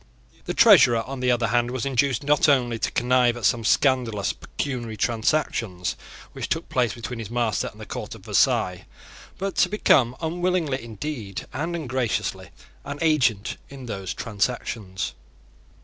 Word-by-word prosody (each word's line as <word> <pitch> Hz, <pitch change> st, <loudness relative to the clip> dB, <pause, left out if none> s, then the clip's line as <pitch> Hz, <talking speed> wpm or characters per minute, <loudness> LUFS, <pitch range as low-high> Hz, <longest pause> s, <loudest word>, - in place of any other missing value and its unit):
The -, -, -3 dB
Treasurer, 120 Hz, -3 st, +7 dB
on 135 Hz, +2 st, -6 dB
the 125 Hz, 0 st, +1 dB
other 120 Hz, -2 st, +2 dB
hand, 120 Hz, 0 st, +2 dB
was 125 Hz, -1 st, -3 dB
induced 135 Hz, -1 st, +1 dB
not 150 Hz, +1 st, +3 dB
only 120 Hz, -5 st, +2 dB
to -, -, 0 dB
connive 125 Hz, 0 st, +2 dB
at 115 Hz, -, -3 dB
some 120 Hz, +1 st, +2 dB
scandalous 115 Hz, -5 st, +2 dB
pecuniary 120 Hz, -5 st, -5 dB
transactions 110 Hz, -, 0 dB, 0.4 s
which -, -, -5 dB
took -, -, -2 dB
place 125 Hz, -4 st, +1 dB
between 120 Hz, 0 st, -6 dB
his 110 Hz, -3 st, -6 dB
master 120 Hz, -4 st, 0 dB
and -, -, -11 dB
the -, -, -8 dB
court -, -, -6 dB
of -, -, -15 dB
Versailles, -, -, +2 dB, 0.5 s
but 195 Hz, 0 st, -3 dB
to -, -, +4 dB
become, 130 Hz, -, +3 dB
unwillingly 170 Hz, -4 st, -1 dB
indeed 115 Hz, -3 st, -6 dB
and 165 Hz, +6 st, -2 dB
ungraciously, 115 Hz, -, -2 dB, 0.3 s
an 145 Hz, -, -6 dB
agent 130 Hz, -10 st, +1 dB
in 135 Hz, -2 st, -9 dB
those 95 Hz, -6 st, -5 dB
transactions. 105 Hz, -3 st, -3 dB
120 Hz, 150 wpm, -24 LUFS, 115-140 Hz, 0.5 s, Treasurer